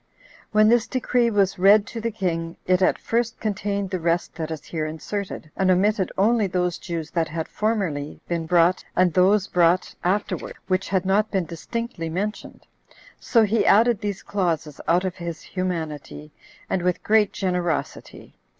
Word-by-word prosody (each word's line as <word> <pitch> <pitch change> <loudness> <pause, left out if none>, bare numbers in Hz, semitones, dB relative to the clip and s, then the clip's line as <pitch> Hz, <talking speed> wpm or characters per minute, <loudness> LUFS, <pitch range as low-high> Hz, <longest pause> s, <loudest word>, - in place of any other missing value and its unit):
When 215 0 +5
this 235 0 +3
decree 250 -2 +1
was 200 -4 +1
read 200 +2 +6
to 230 +2 -7
the 230 - -1
king, 170 -6 -3
it 185 0 +2
at - - +3
first 235 0 -1
contained 200 -2 -2
the 185 - -1
rest 170 +1 0
that 160 -1 -5
is 160 -2 -6
here 155 -2 -3
inserted, 160 0 -5
and 190 -1 +1
omitted 190 +1 +2
only 215 +1 +3
those 180 -1 -1
Jews 165 -3 -5
that 165 -3 0
had 160 +1 -4
formerly 185 -10 -2
been 170 -2 -2
brought, 175 +1 +3
and 180 -2 +3
those 190 +2 +4
brought 175 -1 +2
afterwards, 200 +4 -2
which 185 +1 0
had 190 -1 0
not 205 +3 +2
been 190 -4 -1
distinctly 170 +1 -5
mentioned; 200 +6 -5 0.5
so 230 -2 +3
he 215 +2 +2
added 230 +1 +4
these 205 -2 -4
clauses 165 -7 -2
out 175 +3 +3
of 185 -1 -3
his 170 -2 -6
humanity, 160 -5 -5 0.4
and 185 - -1
with 180 0 -1
great 215 -1 +3
generosity. 180 -3 -3
185 Hz, 165 wpm, -23 LUFS, 170-210 Hz, 0.5 s, read